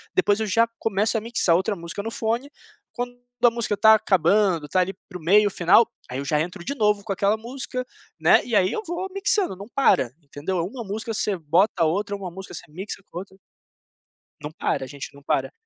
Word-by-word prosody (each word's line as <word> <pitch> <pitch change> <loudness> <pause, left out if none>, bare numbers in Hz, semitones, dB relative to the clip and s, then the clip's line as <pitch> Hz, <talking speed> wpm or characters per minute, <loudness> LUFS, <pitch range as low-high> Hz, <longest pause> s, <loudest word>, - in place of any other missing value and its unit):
Depois 220 - +3
eu 220 - 0
já 225 +3 +3
começo 215 +1 +1
a 215 - -2
mixar 225 -7 +1
outra 200 +3 -1
música 170 +2 -6
no 225 +2 -5
fone. 230 +5 -2 0.4
Quando 245 0 -5 0.2
a 240 - +7
música 230 -3 -1
está 220 +2 +7
acabando, 195 -4 +3
está 150 +6 0
ali 185 +1 +1
para 180 -2 -8
o - - -15
meio 205 +5 +4
final, 180 +6 +5 0.2
aí 125 - -4
eu 140 - -4
já 150 +1 +1
entro 175 +2 -5
de 280 - -2
novo 210 -5 +1
com 205 - -2
aquela 200 +3 +1
música, 255 +2 -5 0.3
né, - - +5
e 235 - -2
aí 185 -2 +4
eu - - -2
vou 345 +3 -3
mixando, 395 - +1
não 200 +4 -10
para, 235 - +3
entendeu, 145 +6 -4
é 170 - 0
uma 235 +7 -6
música, 220 +2 -4
você 205 -2 0
bota 170 +6 +3
a - - +4
outra. 200 +5 -1
Uma 190 -3 -6
música, 190 +2 -9
você - - -7
mixa 190 +4 -7
com 175 - -5
outra. 190 0 -11 1.0
Não 150 +1 -6
para, 155 - -2
a - - -10
gente 140 +1 -8
não 140 - -15
para. - - 0
200 Hz, 220 wpm, -24 LUFS, 175-225 Hz, 1.0 s, a